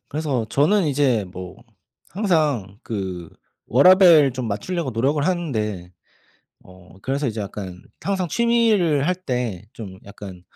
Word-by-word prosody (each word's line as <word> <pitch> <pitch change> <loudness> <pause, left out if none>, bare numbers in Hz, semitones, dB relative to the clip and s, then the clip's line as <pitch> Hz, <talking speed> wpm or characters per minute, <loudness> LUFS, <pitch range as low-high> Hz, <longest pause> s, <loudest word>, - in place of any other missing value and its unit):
그래서 140 -7 -2
저는 170 +6 +2
이제 130 -7 +1
뭐 90 0 -8 0.5
항상 150 - 0
그 95 -6 -5 0.4
워라밸 160 - +6
좀 130 -2 -4
맞추려고 150 - -3
노력을 140 +6 0
하는데 110 - -2 0.7
어 90 0 -17
그래서 140 +2 -1
이제 110 -1 -4
약간 95 -3 -7 0.2
항상 190 -3 -2
취미를 210 -9 +2
할 180 - +2
때 125 - -4
좀 95 -4 -9
약간 100 -3 -10
130 Hz, 245 characters per minute, -22 LUFS, 100-170 Hz, 0.7 s, 워라밸